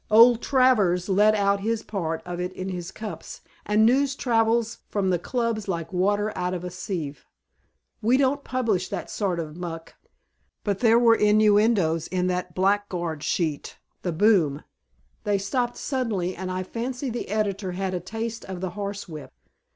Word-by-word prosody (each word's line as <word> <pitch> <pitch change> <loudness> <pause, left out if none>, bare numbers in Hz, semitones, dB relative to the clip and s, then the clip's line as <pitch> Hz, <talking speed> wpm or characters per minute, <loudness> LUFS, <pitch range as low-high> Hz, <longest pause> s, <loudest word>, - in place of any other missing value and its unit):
Old 230 +2 +7
Travers 210 -9 +3
let 210 +3 +4
out 200 -1 +2
his 220 +2 -1
part 165 -6 -3
of 175 0 -5
it 180 +1 -2
in 185 +1 -5
his 175 -2 -5
cups, 215 +1 -8 0.3
and 210 +1 +4
news 270 +3 +3
travels 230 -2 +1
from 195 -3 0
the 175 - +1
Clubs 230 +1 -2
like 170 -1 -3
water 205 +3 +1
out 180 0 -1
of 175 - -5
a 180 - -5
sieve. 170 -5 -5 0.7
We 235 +4 +3
don't 280 +1 +1
publish 220 -8 -1
that - - -5
sort 190 -5 -1
of 155 -2 -5
muck, 165 -2 -7 0.7
but 200 -2 -1
there 230 -1 +5
were 235 -1 +6
innuendoes 210 -6 +3
in 180 -1 -1
that 180 -1 -4
blackguard 185 -5 0
sheet, 155 -2 -2 0.2
The 180 - -2
Boom. 165 -6 +3 0.6
They 205 -1 +1
stopped 240 +5 -1
suddenly 220 -10 -2
and 185 +1 -5
I 185 0 -2
fancy 245 +6 -4
the 235 - -5
editor 200 -3 -1
had 190 +1 -2
a 180 - -1
taste 225 +5 -5
of 190 -2 -6
the 185 -1 -3
horsewhip. 200 -6 -6
200 Hz, 165 wpm, -25 LUFS, 180-225 Hz, 0.7 s, Old